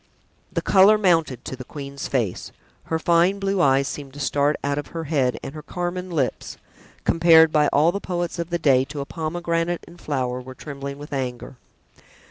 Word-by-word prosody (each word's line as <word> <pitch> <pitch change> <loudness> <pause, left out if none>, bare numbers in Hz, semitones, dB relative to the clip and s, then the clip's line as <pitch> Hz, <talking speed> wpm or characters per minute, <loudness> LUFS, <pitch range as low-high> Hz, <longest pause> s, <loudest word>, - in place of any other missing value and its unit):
The - - -2
color 200 +2 +6
mounted 165 - +1
to - - -5
the 130 - -8
queen's 140 0 -7
face; 115 -9 -2 0.3
her 160 - -1
fine 170 +4 +3
blue 195 -1 0
eyes 135 -2 +3
seemed 140 -2 -7
to - - -9
start 145 +1 +1
out 145 0 0
of 145 - -6
her 165 -1 -5
head 135 -6 0
and 135 - -6
her 155 - -7
carmine 180 +3 -4
lips, 150 -7 -2 0.5
compared 165 -1 +6
by 150 -1 +3
all 150 +5 +3
the 200 +2 -4
poets 175 -1 -3
of 170 0 -3
the 175 - 0
day 135 -5 +4
to 145 +1 -6
a - - -4
pomegranate 170 +2 -2
in 170 - -14
flower, 130 -5 -2
were 130 +1 -10
trembling 140 0 -7
with 145 0 -9
anger. 125 -1 -4
150 Hz, 190 wpm, -23 LUFS, 140-170 Hz, 0.5 s, color